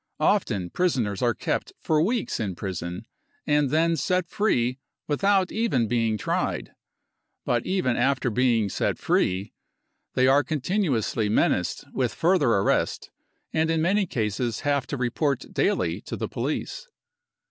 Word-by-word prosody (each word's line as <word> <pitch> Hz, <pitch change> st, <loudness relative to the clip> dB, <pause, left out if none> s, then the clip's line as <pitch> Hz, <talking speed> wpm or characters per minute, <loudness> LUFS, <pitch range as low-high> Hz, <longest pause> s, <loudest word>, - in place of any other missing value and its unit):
Often 105 Hz, -, +1 dB
prisoners 125 Hz, -, 0 dB
are 120 Hz, -2 st, +2 dB
kept -, -, -2 dB
for 155 Hz, -1 st, +1 dB
weeks 225 Hz, +6 st, 0 dB
in 100 Hz, -5 st, -2 dB
prison 90 Hz, +1 st, -5 dB, 0.4 s
and 145 Hz, -2 st, +2 dB
then 165 Hz, +3 st, +2 dB
set 180 Hz, +1 st, 0 dB
free 125 Hz, -, 0 dB, 0.3 s
without 190 Hz, +4 st, +2 dB
even 210 Hz, -, +1 dB
being 115 Hz, -1 st, +1 dB
tried. -, -, -2 dB, 0.7 s
But 120 Hz, -2 st, 0 dB
even 185 Hz, -10 st, +1 dB
after 130 Hz, 0 st, +1 dB
being 115 Hz, -2 st, +2 dB
set -, -, -1 dB
free 95 Hz, +3 st, 0 dB, 0.6 s
they 130 Hz, -, +4 dB
are 135 Hz, +2 st, +5 dB
continuously 135 Hz, -, 0 dB
menaced 90 Hz, -1 st, +1 dB
with 125 Hz, -3 st, -1 dB
further 170 Hz, -6 st, +3 dB
arrest, 100 Hz, -3 st, +1 dB, 0.4 s
and 160 Hz, 0 st, +1 dB
in 165 Hz, 0 st, +1 dB
many 195 Hz, +2 st, +2 dB
cases 115 Hz, -2 st, -2 dB
have 140 Hz, -2 st, 0 dB
to 140 Hz, -, -3 dB
report 130 Hz, +2 st, -1 dB
daily -, -, 0 dB
to -, -, -3 dB
the -, -, -3 dB
police. -, -, -4 dB
130 Hz, 135 wpm, -25 LUFS, 110-165 Hz, 0.7 s, are